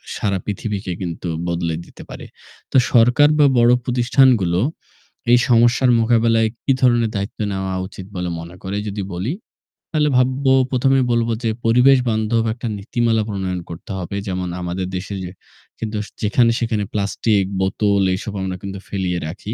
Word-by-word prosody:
সারা 100 -2 -1
পৃথিবীকে 105 -1 -4
কিন্তু 85 0 -4 0.2
বদলে 85 -1 -1
দিতে - - -13
পারে। - - -9 0.5
তো - - +3 0.2
সরকার 125 +5 +5
বা 145 - +7
বড় 120 +1 +5
প্রতিষ্ঠানগুলো 120 -7 +3 0.7
এই 120 - +7
সমস্যার 120 +2 +4
মোকাবেলায় 115 -1 +3 0.2
কি 135 - +3
ধরনের 120 -3 +3
দায়িত্ব 100 +1 -4
নেওয়া 95 -1 -3
উচিত 95 0 -10
বলে 90 0 -2
মনে 85 +2 -10
করে 95 +2 -4
যদি 100 0 -4
বলি। 95 +10 -2 0.6
তাহলে 150 -3 +2
ভাববো 130 +1 +2 0.2
প্রথমে 135 +1 +3
বলব 115 0 +1
যে, 115 - +1 0.2
পরিবেশ 125 +4 +5
বান্ধব 110 +1 +1
একটা 120 +1 -6
নীতিমালা 115 +2 0
প্রণয়ন 95 -3 -3
করতে 85 +3 -9
হবে। 95 +1 -5
যেমন 90 -1 -2
আমাদের 90 +1 -3
দেশে 95 +2 -4
যে 90 - -6 0.5
কিন্তু 105 -2 -3 0.2
যেখানে-সেখানে 115 0 +1
প্লাস্টিক 100 0 +1 0.2
বোতল 100 +1 +1
এসব 100 +2 -6
আমরা 95 -1 -3
কিন্তু 100 -1 -6
ফেলিয়ে 90 -3 -2
রাখি। 100 +6 -6
105 Hz, 150 wpm, -20 LUFS, 95-120 Hz, 0.7 s, বা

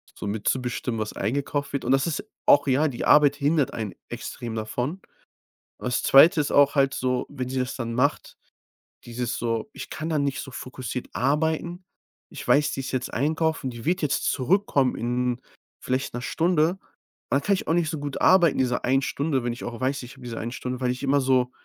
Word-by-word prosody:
so - - -7
mitzubestimmen, 115 +2 -2
was 105 - -4
eingekauft 140 +6 -2
wird. 140 - -2
Und 125 - 0
das 135 +2 +3
ist 160 - -2 0.2
auch 145 0 +5
ja, 140 +4 +3
die 125 -4 -4
Arbeit 145 -2 +6
hindert 145 0 +1
einen 110 -4 -4 0.2
extrem 115 -2 -6
davon. 125 - -3 0.8
Das 125 0 -1
2. 150 +4 +7
ist 145 - -1
auch 140 0 +5
halt 135 -1 +3
so, 125 0 -1
wenn 130 -3 -4
sie 130 0 -2
das 125 +2 -3
dann 115 -2 -4
macht 140 +5 0 0.7
dieses 120 0 -3
so 115 -2 -2
ich - - -8
kann 155 +1 -5
da 155 - +1
nicht 140 -1 -1
so - - -9
fokussiert 130 -1 -6
arbeiten. 160 +6 0 0.4
Ich - - -9
weiß, 145 0 +3
die 135 - -3
ist 130 - -5
jetzt 130 -1 -2
einkaufen, 155 +1 0
die 120 -2 -9
wird 180 +1 +1
jetzt 150 - 0
zurückkommen 140 -3 +2
in 125 +1 -1 0.4
vielleicht 130 +2 -2
'ner 120 - -3
Stunde. 165 +2 +2
Und 190 - -11 0.5
dann 140 - +3
kann 200 +8 +2
ich 190 - -4
auch - - +3
nicht 170 -2 +1
so 160 - -4
gut 145 -1 -5
arbeiten 175 -5 +5
diese 125 -1 0
einen 135 +2 +3
Stunde, 140 -1 -1
wenn 120 - -1
ich 120 - -9
auch 120 +1 -6
weiß, 135 +2 -1
ich 125 +1 -10
habe 135 - -17
diese 115 -2 -5
eine 115 +1 -4
Stunde, 125 0 -5
weil 125 - +1
ich 125 +2 -4
immer 140 +1 +3
so 130 -1 +2
135 Hz, 210 wpm, -25 LUFS, 125-150 Hz, 0.8 s, 2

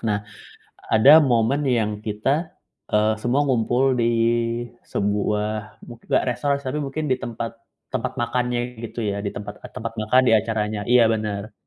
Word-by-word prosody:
Nah, 105 -2 -1 0.7
ada 140 +9 +8
momen 125 +1 +2
yang 105 -3 0
kita, 135 +10 -2 0.3
eee, 105 +1 +3
semua 125 +4 +1
ngumpul 130 +1 +2
di 120 -2 +1 0.8
sebuah 105 +1 -2
mu 120 - -9
nggak - - +1
restoran 130 +3 0
sih, 140 - -13
tapi 150 - -1
mungkin 145 +3 -3
di 130 - +1
tempat 115 0 -5 0.4
tempat - - -3
makannya 120 0 -2
gitu 115 0 -5
ya, 100 0 -2
di 100 - -2
tempat 105 - -8
tempat 115 +1 -6
makan 110 +4 +4
di 115 - +4
acaranya 110 -1 0
iya, 120 -1 +6
benar. 105 -1 -3
115 Hz, 155 wpm, -23 LUFS, 105-125 Hz, 0.8 s, ada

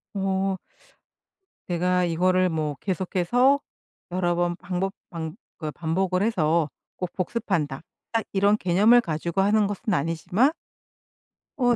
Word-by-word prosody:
어. 195 0 0 1.1
'내가 180 +1 +1
이거를 185 +2 +2
뭐 155 -3 -2
계속해서 195 +9 +2 0.5
여러 175 -1 +1
번 175 0 0
반복 185 +1 -2 0.2
반 160 -2 -5 0.2
그 155 -3 -4
반복을 180 +4 0
해서 165 -7 +2 0.3
꼭 180 -1 -3
복습한다.' 180 - -2 0.3
딱 225 -1 +1
이런 200 +2 +4
개념을 210 +6 +5
가지고 170 0 -3
하는 205 +1 +3
것은 205 +2 -2
아니지만 175 - +2 1.1
어 245 -3 +3
185 Hz, 235 characters per minute, -25 LUFS, 170-200 Hz, 1.1 s, 개념을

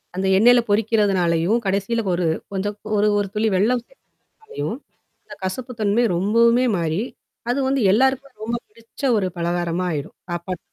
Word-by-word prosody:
அந்த 190 +1 -1
எண்ணெயில 240 +4 +6
பொரிக்கிறதுனாலயும் 205 -3 +2
கடைசியில 200 +4 0
ஒரு 175 0 0 0.3
கொஞ்சம் 205 +2 -2 0.2
ஒரு 205 +1 +3
ஒரு 205 -1 0
துளி 215 +1 +1
வெள்ளம் 230 +6 +2 0.4
சேர்க்குறதுனாலையும் 445 0 -6 0.7
கசப்பு 240 +7 -4
தன்மை 215 +3 +2
ரொம்பவுமே 230 +6 +3
மாறி, 165 +2 -1 0.5
அது 250 +3 +1
வந்து 270 0 +1
எல்லாருக்குமே 265 +5 +2
ரொம்ப 235 +2 -2
பிடிச்ச 230 +4 -16 0.2
ஒரு 195 -3 0
பலகாரமா 175 +1 -1
ஆயிரும். 145 -3 -5
சாப்பாட்டு. 175 +1 -4
205 Hz, 135 wpm, -21 LUFS, 185-235 Hz, 0.7 s, எண்ணெயில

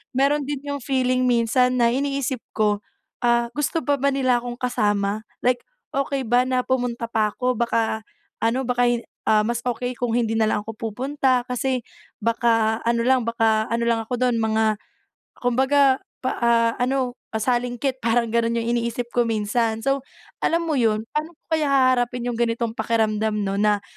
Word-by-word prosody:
Meron 280 +2 +2
din 290 -2 -2
yung 285 0 -2
feeling 255 -1 +1
minsan 250 +2 +2
na 235 - +5
iniisip 275 -1 -1 0.2
ko, 210 -1 +1 0.4
"Ah, 235 -1 +2
gusto 295 +3 -1
pa 285 -1 +3
ba 280 - +3
nila 255 -3 +2
akong 245 0 -6
kasama?" 210 -4 0 0.2
Like, 245 -1 +2 0.3
"Okey 275 0 -1
ba 245 +2 +3
na 255 -1 +1
pumunta 245 -2 -1
pa 215 -2 +1
ko, 250 0 +1
baka 225 -2 0 0.4
ano 235 +4 +1
baka 245 0 +2
hi 240 -1 +1 0.3
ah, 215 -1 +4
mas 235 0 -1
okey 245 0 -2
kung 245 -2 -1
hindi 225 -2 0
na 220 - +3
lang 205 - 0
ako 225 - -6 0.2
pupunta, 255 +1 0
kasi 255 0 -1 0.4
baka 225 -1 +2
ano 235 0 +2
lang, 260 -1 +4
baka 225 -2 +2
ano 235 0 0
lang 225 -1 +1
ako 245 +2 -3
dun 245 -2 +2
mga 220 0 +2 0.6
kumbaga, 265 +2 +3 0.2
pa 255 - +1
ah, 230 -1 +3
ano, 255 0 0 0.2
pasalingkit," 245 +3 -1
parang 230 0 +2
ganun 235 0 +1
yung 230 - -3
iniisip 235 +1 -3
ko 240 -1 +2
minsan. 220 +1 0
So, 275 0 0 0.4
alam 335 +1 +2
mo 305 -3 0
'yun, 220 -2 +2
paano 310 +3 -3
ko - - -71 0.2
kaya 300 -2 0
haharapin 250 -2 +2
yung 230 - -5
ganitong 235 -1 0
pakiramdam 220 -1 0
'no, 195 0 -1
na 210 -1 +2
240 Hz, 175 wpm, -23 LUFS, 225-255 Hz, 0.6 s, na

